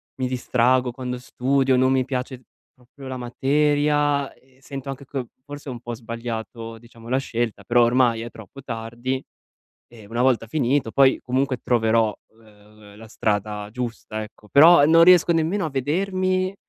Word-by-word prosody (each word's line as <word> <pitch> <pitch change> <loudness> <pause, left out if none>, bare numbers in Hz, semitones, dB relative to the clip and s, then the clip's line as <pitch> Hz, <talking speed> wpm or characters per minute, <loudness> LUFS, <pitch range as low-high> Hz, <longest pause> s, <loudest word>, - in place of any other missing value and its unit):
mi 130 -1 -2
distraggo 125 0 +1
quando 125 0 -5
studio, 130 +1 +1
non 130 +1 +3
mi 130 -1 +2
piace 130 -1 -5 0.3
proprio 130 +2 -14
la 130 0 -5
materia 145 +3 +1
e 130 0 -28
sento 135 -1 -7
anche 135 +1 -7
che 130 -2 -5 0.2
forse 145 0 -9
ho - - -4
un 120 - -8
po' 120 -1 -6
sbagliato, 115 0 -6
diciamo, 115 0 -16
la 130 +1 +2
scelta, 120 -4 -3
però 120 0 +3
ormai 120 -1 +2
è 120 +1 -7
troppo 115 +5 -13
tardi 120 +2 -4 0.7
e 115 -3 -15
una 115 +3 -2
volta 125 -3 +2
finito, 130 -2 0
poi, 135 -1 +4
comunque 130 +1 -1
troverò 115 -2 +2 0.3
l 105 -2 -21 0.3
l - - -16
la 110 +1 -12
strada 105 -1 -2
giusta, 115 -2 -5
ecco; 105 0 -13
però 150 +2 +7
non 165 +2 +6
riesco 175 -1 +6
nemmeno 165 +3 0
a - - -5
vedermi, 185 +6 -1
130 Hz, 165 wpm, -23 LUFS, 115-140 Hz, 0.7 s, però